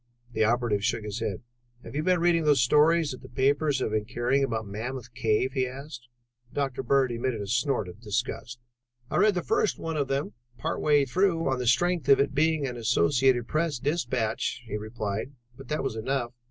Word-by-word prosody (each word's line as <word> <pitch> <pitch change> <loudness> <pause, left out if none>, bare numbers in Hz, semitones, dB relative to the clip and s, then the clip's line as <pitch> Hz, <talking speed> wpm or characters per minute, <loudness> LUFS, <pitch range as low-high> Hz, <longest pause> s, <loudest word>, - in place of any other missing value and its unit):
The 110 - +2
operative 115 -2 +1
shook 110 +1 0
his 105 +1 -4
head. 110 -2 -3 0.4
"Have - - -10
you 150 - -1
been 180 +2 +2
reading 170 -1 +3
those 145 -4 +4
stories 150 +4 +4
that 130 -2 -8
the 130 - -12
papers 140 +3 +1
have 110 - -1
been 105 -1 0
carrying 120 +4 0
about 115 -4 -2
Mammoth 120 +4 -6
Cave?" 120 +1 +1
he 130 -2 0
asked. 130 -2 -9 0.4
Dr. 135 -3 -2
Bird 135 0 +2
emitted 120 0 -2
a 100 - -4
snort 120 0 0
of 90 +5 -11
disgust. 120 +2 -3 0.5
"I - - 0
read 205 +1 +4
the 180 - -1
first 215 - +1
one 160 -1 -4
of 140 -2 0
them 135 -5 -2 0.2
part - - -3
way 145 -2 +4
through 170 +4 +1
on 130 -1 0
the 125 - -2
strength 170 +4 +2
of 140 - +7
its 140 0 +1
being 155 0 +2
an 125 -2 -4
Associated 120 +1 +2
Press 155 -1 0
dispatch," 120 -5 -1
he 110 - -5
replied, 110 +3 -4 0.2
"but 135 - -12
that 150 -2 -2
was 135 - -2
enough. 120 +1 -2
130 Hz, 200 wpm, -27 LUFS, 115-145 Hz, 0.5 s, of